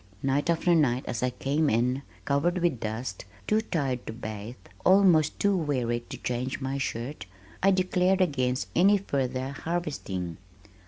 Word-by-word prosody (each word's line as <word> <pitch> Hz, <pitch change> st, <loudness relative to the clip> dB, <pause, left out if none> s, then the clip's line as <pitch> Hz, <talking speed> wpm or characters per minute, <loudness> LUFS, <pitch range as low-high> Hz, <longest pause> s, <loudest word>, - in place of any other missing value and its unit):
Night 140 Hz, +4 st, +1 dB
after 170 Hz, +1 st, +3 dB
night 130 Hz, -6 st, +2 dB
as 115 Hz, -, -3 dB
I 125 Hz, -, +2 dB
came 140 Hz, +4 st, 0 dB
in 125 Hz, +4 st, +1 dB, 0.2 s
covered 145 Hz, +6 st, +1 dB
with 170 Hz, -8 st, +1 dB
dust, 110 Hz, -3 st, -4 dB, 0.2 s
too 215 Hz, +1 st, +2 dB
tired 140 Hz, -, -2 dB
to -, -, -4 dB
bathe, 110 Hz, 0 st, -6 dB, 0.3 s
almost 185 Hz, -5 st, +5 dB
too 200 Hz, -1 st, +3 dB
weary 130 Hz, -8 st, 0 dB
to -, -, -6 dB
change 125 Hz, +2 st, -3 dB
my 135 Hz, 0 st, -2 dB
shirt, 120 Hz, -4 st, -4 dB, 0.3 s
I 195 Hz, -, +5 dB
declared 185 Hz, 0 st, +2 dB
against 130 Hz, -8 st, 0 dB
any 200 Hz, +4 st, +6 dB
further 130 Hz, -7 st, -2 dB
harvesting. 140 Hz, -, -4 dB
140 Hz, 150 wpm, -27 LUFS, 125-175 Hz, 0.3 s, any